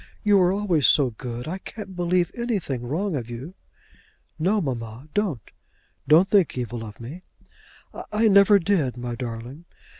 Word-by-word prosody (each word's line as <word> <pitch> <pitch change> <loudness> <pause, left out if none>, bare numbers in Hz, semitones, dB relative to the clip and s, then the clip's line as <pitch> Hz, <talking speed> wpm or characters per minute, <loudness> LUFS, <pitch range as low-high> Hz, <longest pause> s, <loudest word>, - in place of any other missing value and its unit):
You 205 -1 +5
were 180 -1 +4
always 190 -8 +2
so 135 -4 +4
good; 120 +2 -7
I 185 +4 -4
can't 200 -2 -9
believe 175 0 +1
anything 200 - -2
wrong 160 +9 -2
of 120 -4 -4
you." 125 +9 -7 0.9
"No, 195 +7 +2
mamma; 125 - -5
don't. 195 - -1 0.6
Don't 160 +6 +6
think 195 -9 +2
evil 120 -2 -4
of 105 -1 -10
me." 135 +10 -8 0.9
"I 220 +2 +3
never 200 0 +6
did, 165 -10 0
my 120 0 -4
darling." 120 +5 -7
160 Hz, 150 wpm, -24 LUFS, 125-195 Hz, 0.9 s, Don't